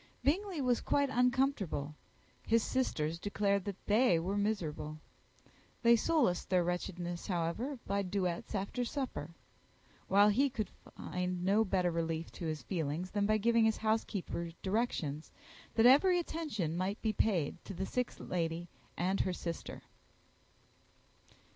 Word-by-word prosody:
Bingley 360 +2 +1
was 250 -2 +2
quite 285 -1 +1
uncomfortable; 250 - +1 0.5
his 230 -1 +2
sisters 165 -11 -1
declared 200 0 0
that 200 -2 -6
they 215 -3 +4
were 180 +5 -1
miserable. 160 -8 -2 0.9
They 235 0 +7
solaced 235 - +1
their 180 -2 +3
wretchedness, 175 0 -3
however, 185 - -1
by 200 +1 0
duets 185 0 -2
after 200 +5 -2
supper; 245 - -3 0.8
while 205 +2 +6
he 270 +7 +3
could 220 -6 -3 0.3
find 180 0 -3
no 205 +3 +4
better 185 -3 +1
relief 165 0 -2
to 170 - -5
his 155 -1 -3
feelings 165 0 -2
than 205 -1 +1
by 215 0 +3
giving 230 +1 +3
his 220 0 +2
housekeeper 215 -6 -1
directions 190 -8 -1 0.5
that 225 - +5
every 350 +8 +6
possible 325 - -5
attention 195 - -2
might 190 +4 -1
be 220 -1 +1
paid 175 -7 0
to 195 - -7
the 190 +3 -2
sick 250 +4 -1
lady 170 -1 -2 0.3
and 185 +3 +1
her 185 - 0
sister. 170 -1 -5
195 Hz, 140 wpm, -33 LUFS, 175-235 Hz, 0.9 s, They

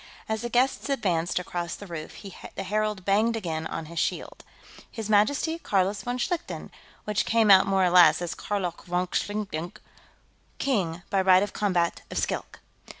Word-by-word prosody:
As 220 -1 -2
the 240 - -3
guests 255 +4 +1
advanced 180 -10 0
across 175 -1 -3
the 205 - -10
roof, 170 +2 -8 0.3
the 195 - -4
herald 210 -1 -1
banged 215 +4 +2
again 160 -7 -3
on 165 - -5
his 165 +1 -5
shield. - - -3 0.5
"His 220 -2 -5
Majesty, 285 +10 +2
Carlos 195 - 0
von 245 0 -3
Schlichten," 345 +7 -3 0.3
which 210 -1 0
came 225 -2 +3
out 190 0 +7
more 195 -1 +3
or 180 - +2
less 180 -1 +7
as 175 -2 -3
Karlok 195 -4 -4
vonk 180 +1 -1
Zlikdenk 200 -5 -3 0.8
"King, 185 -10 -1
by 195 - +3
right 185 0 +5
of 205 - -4
combat, 180 -5 0
of - - -5
Skilk!" - - -3
195 Hz, 165 wpm, -26 LUFS, 175-215 Hz, 0.8 s, out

